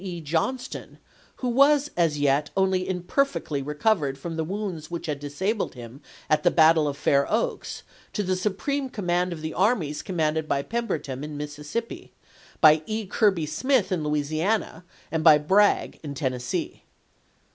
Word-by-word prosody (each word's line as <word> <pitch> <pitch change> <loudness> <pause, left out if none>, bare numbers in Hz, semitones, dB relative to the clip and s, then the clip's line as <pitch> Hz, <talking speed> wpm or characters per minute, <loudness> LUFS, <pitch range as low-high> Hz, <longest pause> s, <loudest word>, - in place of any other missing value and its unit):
E. 180 -3 -5
Johnston, 165 - -3 0.4
who 255 - -4
was 280 +3 +4
as 165 -4 +2
yet 145 +1 +2
only 190 -1 +1
imperfectly 180 - -1
re 150 +2 -5
covered 150 -7 +1
from 165 +4 -6
the 160 - -1
wounds 180 -3 -4
which 170 -1 -5
had 150 -3 -3
disabled 190 +10 -2
him 120 +3 -10 0.3
at 155 - +2
the 175 - +4
battle 160 -2 +5
of 140 -1 -3
Fair 140 -1 +2
Oaks, 225 +2 -2 0.3
to 210 - -1
the 185 -1 0
supreme 260 +9 -2
command 180 -5 -1
of 165 -2 -6
the 155 - -3
armies 185 -7 +1
commanded 160 -4 -1
by 140 -1 0
Pemberton 155 - -3
in 150 -1 -6
Missis 150 0 -7
sippi, 235 +11 -4 0.5
by 155 -1 +7
E. 220 0 -2
Kirby 190 -4 +2
Smith 215 - +1
in 175 -4 0
Louisiana, 155 +5 -1 0.3
and 160 -1 -1
by 155 -2 +8
Bragg 195 +8 +2
in 145 -3 -6
Tennessee. 130 -3 -3
165 Hz, 160 wpm, -25 LUFS, 150-205 Hz, 0.5 s, by